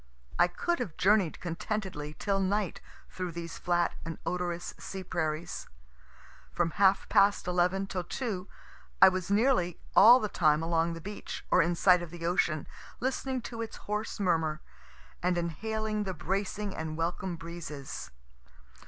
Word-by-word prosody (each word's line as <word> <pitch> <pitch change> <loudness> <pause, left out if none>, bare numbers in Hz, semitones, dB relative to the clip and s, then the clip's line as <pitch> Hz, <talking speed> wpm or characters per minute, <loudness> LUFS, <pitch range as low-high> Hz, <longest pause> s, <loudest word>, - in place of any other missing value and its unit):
I 175 - +6
could 345 - -1
have 210 -11 -4
journey'd 195 -3 +3
contentedly 170 -3 -4
till 200 -1 0
night 195 0 0 0.3
through 180 -2 -4
these 170 0 -6
flat 175 -1 +1
and 165 -1 -5
odorous 175 -1 -2
sea 190 -1 -6
prairies. 165 -2 -3 0.8
From 170 -1 0
half 195 +2 +3
past 200 -2 +4
11 180 +2 +1
till 185 -2 -3
2 195 -2 -4 0.5
I 190 - +10
was 185 -1 -3
nearly 205 -5 +2 0.2
all 235 +5 +9
the 215 - -1
time 155 -5 +2
along 165 0 +1
the 165 - -7
beach, 205 0 -6
or - - +6
in 170 +2 +1
sight 180 0 +5
of 175 - -6
the 170 0 -7
ocean, 170 -3 +1 0.3
listening 260 0 -1
to 230 -1 -6
its 225 - -5
hoarse 210 +1 -3
murmur, 160 -5 +1 0.6
and 180 0 +1
inhaling 215 +5 -2
the 190 -2 -4
bracing 195 +4 -2
and 160 -1 -4
welcome 175 +2 -2
breezes. 165 -4 -7
180 Hz, 150 wpm, -30 LUFS, 170-205 Hz, 0.8 s, I